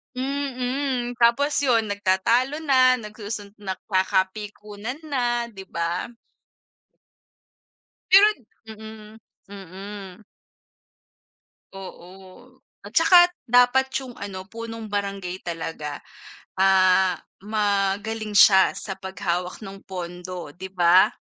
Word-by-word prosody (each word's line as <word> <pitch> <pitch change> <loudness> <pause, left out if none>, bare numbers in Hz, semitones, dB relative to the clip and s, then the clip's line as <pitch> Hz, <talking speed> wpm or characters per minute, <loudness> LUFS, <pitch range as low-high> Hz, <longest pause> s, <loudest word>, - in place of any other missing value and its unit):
Mm, 260 -1 -2
tapos 240 +5 +3
yun 230 -7 +1
nagtatalo 230 +9 +1
na, 255 -3 +5
nagsusun 210 -2 -7
nagkakapikunan 205 +3 -2
na, 240 -5 -1
'di 195 -2 -11
ba? 170 +1 -3 2.0
Pero 395 +3 +8 0.4
mm, 220 0 -11 0.3
mm. 195 +1 -10 1.5
Oo, 190 +6 -13 0.2
at 205 - -11
saka 350 +4 +7 0.2
dapat 245 +2 +4
yung 255 -2 -9
ano 190 -2 -7
punong 230 +1 -8
barangay 200 -3 -4
talaga, 160 -3 -5 0.6
ah, 190 -1 +4 0.2
magaling 210 +1 -1
siya 190 -2 +7
sa 195 - -5
paghawak 185 -1 -4
ng 195 0 -10
pondo, 180 -2 -7
'di 190 +3 -8
ba? 175 0 +5
205 Hz, 90 wpm, -23 LUFS, 190-240 Hz, 2.0 s, Pero